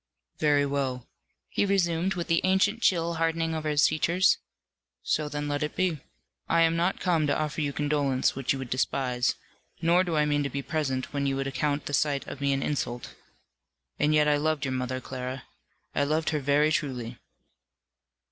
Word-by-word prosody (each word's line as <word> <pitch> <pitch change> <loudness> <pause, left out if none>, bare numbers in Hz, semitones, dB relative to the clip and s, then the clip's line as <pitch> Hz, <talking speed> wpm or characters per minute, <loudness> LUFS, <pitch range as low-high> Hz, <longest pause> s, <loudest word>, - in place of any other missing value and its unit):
"Very 145 -2 +3
well," 135 -3 -2 0.4
he - - 0
resumed, 190 -2 +1
with 170 -1 -3
the 165 -1 +2
ancient 190 +4 +2
chill 170 -4 +2
hardening 165 0 0
over 155 -1 -2
his 150 -1 +4
features; 175 +4 +2 0.6
"so 150 -1 0
then 145 0 -3
let 145 0 -1
it 150 - -2
be. 180 -5 0 0.5
I 165 0 +4
am 165 0 +4
not 175 +3 0
come 165 -5 +1
to - - +1
offer 155 0 -2
you 145 -1 0
condolence, 145 -3 +1
which 135 -1 -1
you 135 - 0
would 130 -2 -7
despise; 125 -1 0 0.4
nor 175 +1 +4
do 170 -3 -2
I 150 - +3
mean 145 -1 +1
to 140 - -1
be 140 0 -4
present 135 -5 -2
when 140 -1 0
you 135 - 0
would 135 0 -2
account 145 +1 -1
the 145 - -5
sight 140 0 +1
of 140 - -8
me 140 0 +2
an 135 0 0
insult. 125 -4 -3 0.9
And 150 +1 +3
yet 150 0 +4
I 145 -1 +4
loved 155 -1 0
your 135 - -2
mother, 130 0 -2
Clara; 130 0 -5 0.5
I 145 - +1
loved 155 +2 0
her 155 - 0
very 145 +2 +3
truly." 125 -6 -2
150 Hz, 190 wpm, -27 LUFS, 135-165 Hz, 0.9 s, his